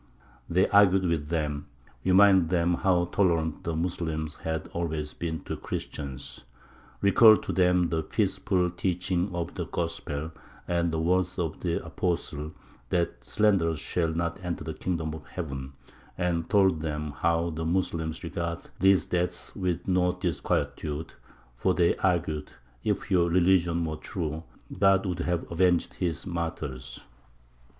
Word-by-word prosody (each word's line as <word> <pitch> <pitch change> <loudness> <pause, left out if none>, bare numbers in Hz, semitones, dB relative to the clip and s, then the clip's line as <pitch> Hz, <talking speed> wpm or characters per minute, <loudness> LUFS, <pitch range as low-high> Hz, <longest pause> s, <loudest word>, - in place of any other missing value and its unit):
They 90 +2 +3
argued 95 -2 +5
with 80 -4 0
them; 75 -3 -2 0.4
reminded 95 -2 +6
them 90 -1 +2
how 90 0 +2
tolerant 85 -5 +1
the 85 - -2
Moslems 80 -2 -2
had 80 -2 -3
always 80 -3 -3
been 80 -1 -4
to - - -5
the - - -7
Christians; 70 -2 -6 0.6
recalled 110 +2 +7
to - - -3
them 90 -1 +3
the 80 -1 0
peaceful 90 +3 0
teaching 90 +1 -1
of 85 -1 -3
the - - -4
gospel, 80 -2 -3 0.4
and 85 -1 +1
the 80 - -1
words 90 +2 +1
of 80 -4 -2
the 85 -2 -2
apostle, 80 -3 -2 0.4
that 85 -1 -1
"Slanderers 95 -7 +2
shall 85 +1 0
not 85 +2 -2
enter 85 -3 -3
the 80 0 -4
kingdom 80 -2 -2
of 80 -1 -9
heaven;" 70 -6 -6 0.4
and 85 -2 -1
told 95 -6 +4
them 75 -1 -3
how 85 0 +1
the 80 +1 -4
Moslems 80 -2 -1
regarded 85 -1 -4
these 95 0 +5
deaths 90 0 -2
with 90 -2 -2
no 90 -1 +2
disquietude, 75 +2 -2 0.4
for 90 +9 +1
they 85 -2 +3
argued, 80 -5 0 0.3
"If - - -1
your 85 -2 +4
religion 85 -1 +3
were 80 -1 -3
true, 80 -1 -4 0.3
God 95 0 +4
would 90 -3 -2
have 85 -1 -1
avenged 90 0 +2
His 85 -6 -2
martyrs." 75 -7 -4
85 Hz, 140 wpm, -28 LUFS, 80-90 Hz, 0.6 s, recalled